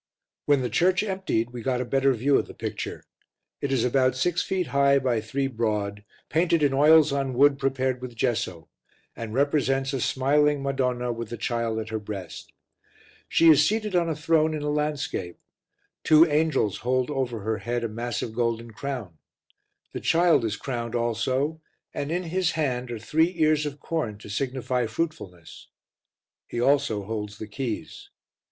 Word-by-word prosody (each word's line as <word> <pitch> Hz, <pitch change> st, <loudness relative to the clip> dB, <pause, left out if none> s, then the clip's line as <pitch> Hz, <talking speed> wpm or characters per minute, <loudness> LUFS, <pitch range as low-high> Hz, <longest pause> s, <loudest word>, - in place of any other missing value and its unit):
When 145 Hz, -2 st, +4 dB
the 125 Hz, -, -1 dB
church 185 Hz, +3 st, +3 dB
emptied 190 Hz, -, -1 dB
we 120 Hz, -1 st, -7 dB
got 125 Hz, +1 st, -1 dB
a 125 Hz, -, -2 dB
better 135 Hz, +2 st, +2 dB
view 135 Hz, +4 st, +2 dB
of -, -, -4 dB
the -, -, -11 dB
picture. -, -, -5 dB, 0.6 s
It 140 Hz, -, -2 dB
is 130 Hz, -3 st, +2 dB
about 130 Hz, 0 st, +2 dB
6 175 Hz, +6 st, +1 dB
ft. 185 Hz, -2 st, -1 dB
high 140 Hz, -1 st, +3 dB
by 125 Hz, -4 st, 0 dB
3 135 Hz, +6 st, -2 dB
broad, 105 Hz, -5 st, -2 dB, 0.2 s
painted 165 Hz, 0 st, +2 dB
in 140 Hz, -2 st, +3 dB
oils 155 Hz, +2 st, +6 dB
on 135 Hz, -2 st, -1 dB
wood 140 Hz, +1 st, +4 dB
prepared 130 Hz, -2 st, -1 dB
with 125 Hz, -2 st, -7 dB
gesso, 105 Hz, -, -2 dB, 0.5 s
and 115 Hz, -2 st, -6 dB
represents 135 Hz, -1 st, +1 dB
a 135 Hz, -, -1 dB
smiling 145 Hz, +3 st, +2 dB
Madonna 125 Hz, -3 st, -1 dB
with 115 Hz, -1 st, -6 dB
the 120 Hz, -, -5 dB
Child 115 Hz, 0 st, -1 dB
at 110 Hz, 0 st, -4 dB
her 110 Hz, -1 st, -2 dB
breast. 100 Hz, -4 st, -8 dB, 0.8 s
She 165 Hz, -, +4 dB
is 150 Hz, -2 st, +7 dB
seated 215 Hz, +1 st, 0 dB
on 170 Hz, -1 st, +2 dB
a 160 Hz, -, -1 dB
throne 155 Hz, +1 st, +2 dB
in 150 Hz, -, -4 dB
a 150 Hz, -, -1 dB
landscape; 145 Hz, -11 st, -2 dB, 0.7 s
two 155 Hz, +1 st, +7 dB
angels 150 Hz, -, +1 dB
hold 130 Hz, +3 st, 0 dB
over 125 Hz, -5 st, -2 dB
her 110 Hz, +1 st, -2 dB
head 120 Hz, +4 st, -2 dB
a -, -, 0 dB
massive 115 Hz, 0 st, -4 dB
golden 115 Hz, 0 st, -1 dB
crown; 110 Hz, -, -6 dB, 0.7 s
the -, -, -3 dB
Child 165 Hz, -5 st, +3 dB
is 110 Hz, -2 st, -1 dB
crowned 120 Hz, -2 st, -4 dB
also 130 Hz, +7 st, -1 dB, 0.3 s
and 145 Hz, +2 st, -3 dB
in 180 Hz, +2 st, -1 dB
His 180 Hz, +1 st, 0 dB
hand 125 Hz, -6 st, -1 dB
are 120 Hz, -, -4 dB
three 160 Hz, -, +1 dB
ears 155 Hz, -2 st, +2 dB
of 145 Hz, 0 st, -7 dB
corn, 140 Hz, -10 st, -3 dB
to 105 Hz, -, -12 dB
signify 125 Hz, +1 st, -1 dB
fruitfulness; 110 Hz, -, -5 dB, 0.8 s
He 120 Hz, -, -4 dB
also 130 Hz, -5 st, +2 dB
holds 105 Hz, 0 st, -5 dB
the 110 Hz, -, -6 dB
keys. 110 Hz, +2 st, -5 dB
130 Hz, 170 wpm, -25 LUFS, 115-150 Hz, 0.8 s, is